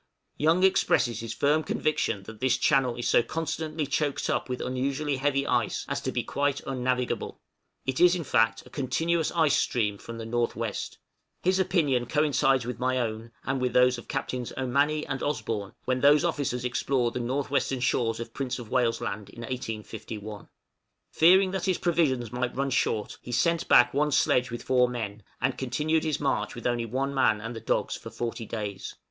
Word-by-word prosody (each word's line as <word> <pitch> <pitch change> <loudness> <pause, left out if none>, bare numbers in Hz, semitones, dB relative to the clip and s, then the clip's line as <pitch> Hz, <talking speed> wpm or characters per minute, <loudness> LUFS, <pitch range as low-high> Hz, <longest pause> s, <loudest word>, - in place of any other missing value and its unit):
Young 160 +5 +2
expresses 120 - +3
his 115 -1 -5
firm 145 +6 +2
conviction 155 -10 -1
that 110 +2 -11
this 130 0 +2
channel 130 -3 +2
is 120 - -3
so - - +5
constantly 155 +3 -3
choked 145 0 -1
up - - -1
with 125 - -3
unusually 135 +3 -1
heavy 140 0 +1
ice - - 0
as - - -2
to - - -2
be - - -1
quite 145 0 0
unnavigable; 125 -1 -2 0.5
it 130 -1 -1
is, 180 0 +7
in 175 - -3
fact, 115 -4 +2
a - - -16
continuous 160 +4 0
ice 160 -4 +3
stream 105 -4 0
from 115 0 -8
the 115 - -6
N.W. 115 -1 -1 0.7
His 185 +1 +2
opinion 150 - +1
coincides 140 -4 +2
with 125 -1 -5
my 130 +1 +1
own, 115 -1 -3
and 135 -1 -1
with 125 -2 0
those 125 -1 +4
of - - -13
Captains 125 -2 -3
Ommanney 140 +4 +1
and 135 -2 -3
Osborn, 110 -8 -2
when 130 0 0
those 145 +3 +5
officers 135 -7 -1
explored 125 -1 0
the - - -2
north 130 +4 -2
western 135 -2 0
shores 115 -2 0
of 115 -1 -7
Prince 135 -3 -3
of 120 -4 -9
Wales' 120 -3 +1
Land 100 0 -4
in 115 - -11
1851. 110 -3 -6 0.6
Fearing 185 +3 +5
that 190 -1 -2
his 185 -2 +1
provisions 140 -10 +1
might 125 0 -2
run 135 +1 -1
short 110 -4 -1
he 125 - -8
sent 165 +8 +1
back 125 0 +6
one 150 +2 +1
sledge 125 -1 +3
with 120 0 -6
four 125 -1 +3
men, 110 -4 -5 0.2
and - - -1
continued 155 +1 0
his 155 -2 -1
march 140 -2 -1
with 120 - -9
only 120 -1 0
one 135 +4 -2
man 110 -6 +3
and 115 +2 -6
the - - -5
dogs - - -1
for - - -8
forty 115 -1 -4
days! 105 -4 -5
130 Hz, 190 wpm, -27 LUFS, 120-145 Hz, 0.7 s, is